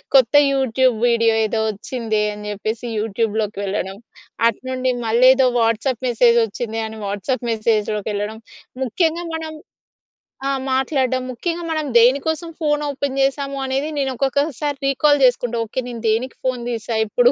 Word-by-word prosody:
కొత్త 255 -2 +5 0.2
YouTube 260 -2 +2
video 230 -1 +3
ఏదో 220 +1 -1
వచ్చిందే 220 0 -2
అని 210 0 -8
జేప్పేసి 220 +4 -4
యూట్యూబ్‌లోకి 215 -1 -1
వెళ్ళడం. 195 0 -3 0.5
అటునుండి 255 +2 -1
మళ్ళీ 235 +3 +4
ఏదో 265 - +3
వాట్సాప్ 230 +3 0
మెసేజ్ 235 0 +4
వచ్చింది 225 +1 -4
అని 220 0 -9
వాట్సాప్ 240 +6 -2
మెసేజ్‌లోకెళ్ళడం. 215 -1 -1 0.4
ముఖ్యంగా 325 - 0
మనం 320 -1 -5 0.9
ఆ! - - +1 0.2
మాట్లాడ్డం. 260 -1 +1
ముఖ్యంగా 335 +7 -3
మనం 310 -2 -1
దేనికోసం 285 +7 +3
ఫోన్ 295 -1 +1
ఓపెన్ 280 -1 -3
జేసాము 275 +1 0
అనేది 270 +3 -1
నేను 270 -1 0
ఒక్కొక్కసారి 280 +2 -1
రీకాల్ 290 +1 +3
జేసుకుంటా. 245 -1 +2
ఓకే, 225 +4 -4
నేను 235 -2 -6
దేనికి 240 +4 0
ఫోన్ 255 -2 -1
దీసా 230 -1 -3
ఇప్పుడూ - - +4
250 Hz, 135 wpm, -20 LUFS, 220-275 Hz, 0.9 s, కొత్త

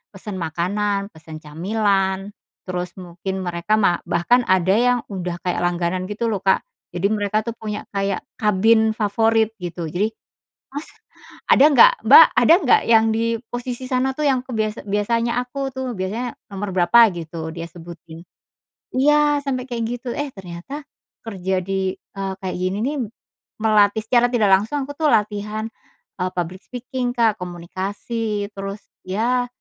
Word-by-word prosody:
pesan 195 0 -6
makanan, 200 +5 -1
pesan 160 -1 -11
camilan, 195 +4 0 0.4
terus 180 -1 -4
mungkin 185 +2 -5
mereka 175 +3 -2
ma 175 -4 +3
bahkan 240 +9 +3
ada 185 0 +3
yang 245 +2 +3
udah 180 -2 -4
kayak 180 - -1
langganan 175 +1 -1
gitu 225 +3 -2
loh 205 -3 -1
Kak, 190 - +4 0.3
jadi 175 +3 +1
mereka 210 0 0
tuh 230 -1 -4
punya 210 -1 -5
kayak 195 -1 -1 0.2
kabin 220 +1 +3
favorit 220 +1 +2
gitu 175 -3 -5
jadi, 205 +7 0 0.6
"Mas 290 +2 -5 0.6
ada 275 - +7
nggak? 475 - +8
Mbak - - +11
ada - - +6
nggak? 255 - +5
Yang 225 -1 +6
di 225 +1 0 0.3
posisi 245 +1 -4
sana 255 +1 0
tuh 305 - 0
yang 260 -2 +2
aku," 255 - -7
biasa 215 0 -1
"biasanya 230 +4 0
aku 270 +2 -4
tuh," 260 -1 -4
biasanya 220 +6 -3 0.2
nomor 200 0 -4
berapa 185 +7 +6
gitu 165 -1 -6
dia 170 0 -6
sebutin. 170 -1 -11 0.7
Iya! 295 +2 +3
Sampai 255 -2 -2
kayak 235 -2 -2 0.2
gitu, 250 - -6
eh, 290 0 -2
ternyata, 185 +9 -8 0.5
kerja 190 -3 -2
di, 190 0 -1
eee, 195 -1 -6
kayak 185 -1 -3
gini 185 +2 -1
nih, 285 +4 -1 0.7
melatih- 215 -1 +3
secara 245 0 +4
tidak 220 -5 +2
langsung- 220 +9 -1
aku 285 - -6
tuh 310 -2 +2
latihan, 210 +1 0 0.5
eee, 185 0 -1
public 180 +2 -4
speaking 250 0 -4
Kak, 225 -4 +3
komunikasi, 200 +5 -4
terus 195 +1 -5 0.3
ya, 240 +6 0
205 Hz, 150 wpm, -21 LUFS, 185-235 Hz, 0.7 s, Mbak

